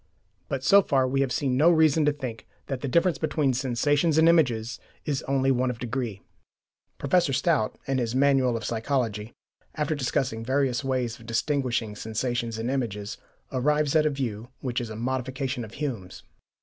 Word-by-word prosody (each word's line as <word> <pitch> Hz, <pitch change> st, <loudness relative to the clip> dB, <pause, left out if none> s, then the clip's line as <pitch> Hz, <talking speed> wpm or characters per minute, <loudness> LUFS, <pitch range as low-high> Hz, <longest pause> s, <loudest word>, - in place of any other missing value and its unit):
But 135 Hz, -1 st, -2 dB
so 200 Hz, +8 st, +7 dB
far 135 Hz, -7 st, +2 dB
we 135 Hz, +1 st, +1 dB
have 135 Hz, -2 st, 0 dB
seen 130 Hz, -1 st, 0 dB
no 155 Hz, +5 st, +6 dB
reason 160 Hz, -2 st, +4 dB
to 150 Hz, -, +4 dB
think 130 Hz, -6 st, -7 dB, 0.2 s
that 135 Hz, -2 st, -4 dB
the 140 Hz, -, -2 dB
difference 170 Hz, +3 st, +2 dB
between 150 Hz, -4 st, +1 dB
sensations 140 Hz, +5 st, +1 dB
and 160 Hz, +1 st, +6 dB
images 125 Hz, -9 st, +2 dB, 0.3 s
is 145 Hz, -3 st, -1 dB
only 135 Hz, 0 st, +2 dB
one 130 Hz, 0 st, +1 dB
of 125 Hz, -, -3 dB
degree. 120 Hz, -4 st, -4 dB, 0.7 s
Professor 150 Hz, 0 st, +2 dB
Stout, 140 Hz, -4 st, +1 dB
in 135 Hz, -1 st, 0 dB
his 120 Hz, 0 st, -2 dB
"Manual 130 Hz, -3 st, +3 dB
of 110 Hz, -, -6 dB
Psychology," 115 Hz, -2 st, -1 dB, 0.4 s
after 155 Hz, +1 st, 0 dB
discussing 130 Hz, -4 st, -1 dB
various 130 Hz, +1 st, 0 dB
ways 125 Hz, -3 st, -1 dB
of 115 Hz, -, -14 dB
distinguishing 120 Hz, -3 st, -1 dB
sensations 115 Hz, +1 st, -2 dB
and 115 Hz, +3 st, -2 dB
images, 105 Hz, -6 st, -3 dB, 0.3 s
arrives 150 Hz, +3 st, +1 dB
at 155 Hz, -1 st, +5 dB
a -, -, +3 dB
view 120 Hz, -6 st, -4 dB
which 125 Hz, -2 st, -2 dB
is 120 Hz, -, -5 dB
a 110 Hz, -, -6 dB
modification 130 Hz, +2 st, -2 dB
of 110 Hz, 0 st, -10 dB
Hume's. 120 Hz, -11 st, -5 dB
130 Hz, 175 wpm, -26 LUFS, 120-145 Hz, 0.7 s, so